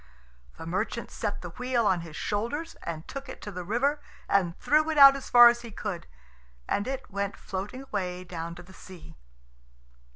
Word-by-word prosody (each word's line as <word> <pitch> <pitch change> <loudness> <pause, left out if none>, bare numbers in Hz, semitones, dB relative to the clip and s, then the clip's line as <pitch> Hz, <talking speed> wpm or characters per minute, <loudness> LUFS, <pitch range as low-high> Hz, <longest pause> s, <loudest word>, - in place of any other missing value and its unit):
The - - -8
merchant 190 +6 -3
set - - -4
the - - -5
wheel 250 -2 0
on 185 -4 +2
his 165 -2 -10
shoulders, 235 - -3
and 160 -1 -6
took 275 0 -7
it - - -8
to 205 - -6
the 180 -2 -6
river 270 - 0 0.3
and 175 -4 +1
threw 310 +2 +2
it 315 - -1
out 275 -1 +10
as 275 - -7
far 240 0 +10
as 240 0 +3
he 235 - -9
could, 200 -4 -5 0.6
and 205 - -1
it 265 -4 -5
went 200 0 -3
floating 205 +8 -6
away 185 -7 -4
down 170 -1 -6
to 175 - -11
the 190 +2 -16
sea. 185 -3 -13
205 Hz, 190 wpm, -28 LUFS, 180-260 Hz, 0.6 s, out